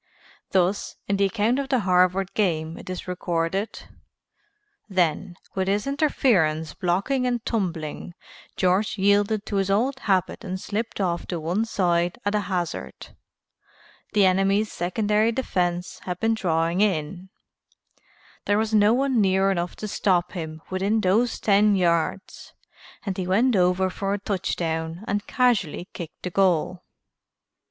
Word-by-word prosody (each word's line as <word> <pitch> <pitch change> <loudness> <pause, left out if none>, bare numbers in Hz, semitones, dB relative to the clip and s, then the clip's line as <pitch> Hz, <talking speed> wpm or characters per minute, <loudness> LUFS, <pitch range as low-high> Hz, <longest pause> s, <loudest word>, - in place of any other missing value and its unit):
Thus, 190 +1 0
in 200 - +1
the 200 - +3
account 225 +5 +1
of 275 -1 -3
the 260 -4 +2
Harvard 185 0 +2
game 165 -6 0
it - - -10
is 185 0 -5
recorded: 180 +2 -2 1.1
"Then, 175 -2 0 0.2
with 190 -1 -1
his 205 +1 0
interference 215 - +1
blocked 180 +7 -1
and 250 -3 0
tumbling, 175 -5 -3 0.4
George 185 +4 +1
yielded 205 +2 +2
to 205 - -2
his 195 0 0
old 250 +7 +1
habit 190 -6 0
and 185 +1 -4
slipped 220 +4 -4
off 175 -3 -1
to 175 - -3
one 175 +8 -1
side 175 -5 0
at 205 - +1
a 210 - +2
hazard. 180 -4 -4 1.0
The 205 -2 +5
enemy's 195 +3 +2
secondary 210 +5 +1
defense 180 -8 -2
had 180 -1 -5
been 225 0 +2
drawing 170 -3 0
in, 185 -1 -1 1.2
there 205 - +2
was 220 0 -1
no 210 +1 +5
one 265 -3 +2
near 190 0 +3
enough 175 -2 -2
to 215 - -6
stop 180 -3 +1
him 160 -3 -6
within 195 +4 +1
those 220 +5 +2
ten 205 0 +4
yards 175 +1 -1 0.5
and 195 -2 -2
he 185 -2 -3
went 225 +6 +3
over 180 0 +3
for 195 +1 -2
a - - -5
touchdown 165 -3 -3
and 205 0 -2
casually 220 - +1
kicked 170 -3 -9
the 180 - -3
goal." 180 -1 +1
190 Hz, 145 wpm, -24 LUFS, 175-210 Hz, 1.2 s, The